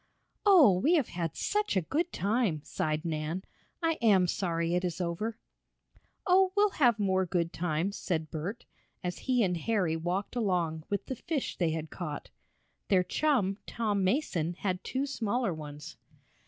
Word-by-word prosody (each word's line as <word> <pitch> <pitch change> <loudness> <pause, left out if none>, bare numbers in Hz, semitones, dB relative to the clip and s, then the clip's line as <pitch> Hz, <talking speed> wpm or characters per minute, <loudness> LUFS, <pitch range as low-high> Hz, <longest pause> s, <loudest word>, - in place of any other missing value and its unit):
"Oh, 295 - +7
we 315 - +4
have 290 -8 +1
had 170 -3 -3
such 415 - 0
a - - +3
good 325 - -1
time!" 200 -6 0
sighed 155 -2 -2
Nan. 160 +3 -2 0.4
"I 325 -1 +1
am 200 -5 +5
sorry 170 -2 -1
it 180 +1 +1
is 175 -1 -2
over." 185 +6 -2 0.9
"Oh, 375 0 +5
we'll 410 0 +5
have 245 - +3
more 190 -2 +2
good 170 0 -1
times," 175 +3 -1
said 160 -5 -2
Bert, 175 +9 -5 0.4
as 180 -1 -3
he 250 -2 +4
and 180 -3 +1
Harry 185 -3 0
walked 175 +7 -2
along 175 -8 0
with 200 - -2
the 260 - -4
fish 290 +2 -3
they 170 -3 +1
had 160 0 -4
caught. 155 -5 -6 0.6
Their 185 -2 +4
chum, 205 -2 +1
Tom 210 -4 0
Mason, 185 - 0
had 185 -1 -2
two 265 +2 -1
smaller 240 -6 -1
ones. 150 -1 -8
190 Hz, 160 wpm, -30 LUFS, 170-235 Hz, 0.9 s, Oh